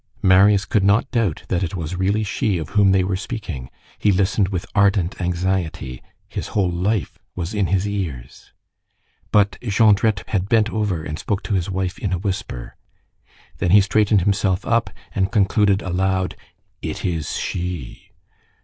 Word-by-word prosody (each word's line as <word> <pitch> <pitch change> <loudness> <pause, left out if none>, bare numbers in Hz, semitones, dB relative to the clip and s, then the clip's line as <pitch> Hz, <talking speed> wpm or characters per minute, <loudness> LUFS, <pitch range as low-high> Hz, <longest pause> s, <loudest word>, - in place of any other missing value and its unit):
Marius 95 +2 +5
could 105 -2 +1
not 105 +7 +3
doubt 110 -10 0
that 90 - 0
it 90 -1 -2
was 80 -1 -4
really 100 +4 +1
she 100 -1 0
of 80 -4 -5
whom 100 -1 +4
they 95 -1 +3
were 95 +1 -1
speaking. 95 - -5 0.3
He 105 - +3
listened 95 +1 +2
with 90 -2 -3
ardent 100 -4 +2
anxiety. 85 -7 -2 0.3
His - - -5
whole 95 -3 +2
life 90 0 -1 0.2
was 90 +2 -4
in 100 -3 +1
his 95 +3 +1
ears. 85 -12 -5 0.8
But 100 -1 +3
Jondrette 105 -2 +3
had 95 -2 -1
bent 110 -1 +3
over 105 -7 -1
and 75 +1 -5
spoke 100 -1 -2
to - - -3
his 90 -1 0
wife 95 -1 -2
in 100 -3 -2
a - - +1
whisper. 90 - -4 0.8
Then - - +1
he 100 +3 +7
straightened 105 0 +3
himself 95 0 +1
up 115 -4 +1 0.2
and 95 0 0
concluded 100 -1 +2
aloud:— 95 0 0 0.5
"It - - -4
is 80 -5 -2
she!" 90 -7 -5
95 Hz, 160 wpm, -21 LUFS, 90-105 Hz, 0.8 s, he